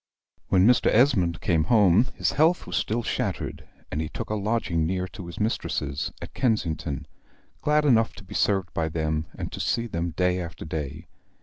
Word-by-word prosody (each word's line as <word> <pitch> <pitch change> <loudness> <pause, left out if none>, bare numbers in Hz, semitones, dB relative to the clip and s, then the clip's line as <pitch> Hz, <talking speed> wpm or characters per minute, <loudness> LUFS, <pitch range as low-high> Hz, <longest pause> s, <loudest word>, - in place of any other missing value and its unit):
When 95 0 +4
Mr. 125 +2 +4
Esmond 95 - +3
came 80 -3 +2
home, 105 0 +5
his - - +1
health 160 +4 +3
was - - -4
still 115 +2 0
shattered; 110 -4 -3 0.2
and 75 - -1
he 80 - -3
took - - -6
a - - +1
lodging 105 -6 0
near 90 +1 -1
to 90 -2 -9
his 85 - -8
mistresses, 75 -9 -1
at - - -9
Kensington, 80 - -1 0.6
glad 150 0 +2
enough 115 -5 +3
to 100 - -11
be 95 - -11
served 95 -4 +1
by 80 -1 0
them, 80 0 -1
and - - -5
to - - -6
see 115 - 0
them 85 -6 -2
day 90 0 +2
after 85 -1 -7
day. 80 0 -5
90 Hz, 185 wpm, -26 LUFS, 80-115 Hz, 0.6 s, home